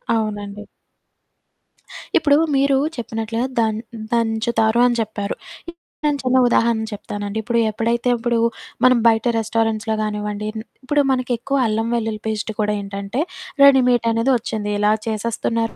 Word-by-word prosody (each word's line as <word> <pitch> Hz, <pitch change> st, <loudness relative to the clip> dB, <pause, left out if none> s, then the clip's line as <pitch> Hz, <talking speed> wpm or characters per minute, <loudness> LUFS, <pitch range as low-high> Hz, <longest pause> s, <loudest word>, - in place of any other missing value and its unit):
అవునండి. 210 Hz, -2 st, -3 dB, 1.5 s
ఇప్పుడూ, 290 Hz, -4 st, +4 dB, 0.2 s
మీరూ 275 Hz, 0 st, +3 dB, 0.2 s
చెప్పినట్లుగా 225 Hz, +1 st, -3 dB
దన్ 220 Hz, -1 st, +1 dB, 0.2 s
హ్మ్, 220 Hz, -, -7 dB
దంచుతారు 225 Hz, 0 st, +1 dB
అని 240 Hz, -, 0 dB
చెప్పారు. 205 Hz, -2 st, -3 dB, 0.3 s
ఇప్పుడు 340 Hz, 0 st, -14 dB, 0.2 s
నేను 290 Hz, -1 st, +1 dB
చిన్న 255 Hz, 0 st, +2 dB
ఉదాహరణ 230 Hz, -1 st, +2 dB
చెప్తానండి. 205 Hz, +1 st, -5 dB
ఇప్పుడు 235 Hz, +2 st, 0 dB
ఎప్పుడైతే 235 Hz, +3 st, 0 dB
ఇప్పుడు 235 Hz, 0 st, 0 dB, 0.4 s
మనం 255 Hz, -1 st, +6 dB
బయట 225 Hz, 0 st, +3 dB
రెస్టారెంట్స్‌లో 225 Hz, 0 st, 0 dB
గానివ్వండి, 210 Hz, 0 st, -3 dB
హ్మ్. 220 Hz, 0 st, -6 dB, 0.2 s
ఇప్పుడు 290 Hz, +3 st, +2 dB
మనకెక్కువ 255 Hz, +1 st, -1 dB
అల్లం 220 Hz, +1 st, -1 dB
వెల్లుల్లి 220 Hz, -2 st, -2 dB
పేస్టు 220 Hz, 0 st, -2 dB
కూడా 210 Hz, 0 st, 0 dB
ఏంటంటే, 200 Hz, +5 st, -4 dB, 0.4 s
రెడీమేటనేది 245 Hz, -3 st, +4 dB
వచ్చింది, 215 Hz, -3 st, -4 dB
ఇలా 210 Hz, +1 st, +3 dB
చేసేస్తున్నారు. 225 Hz, +1 st, -2 dB
225 Hz, 125 wpm, -20 LUFS, 215-240 Hz, 1.5 s, మనం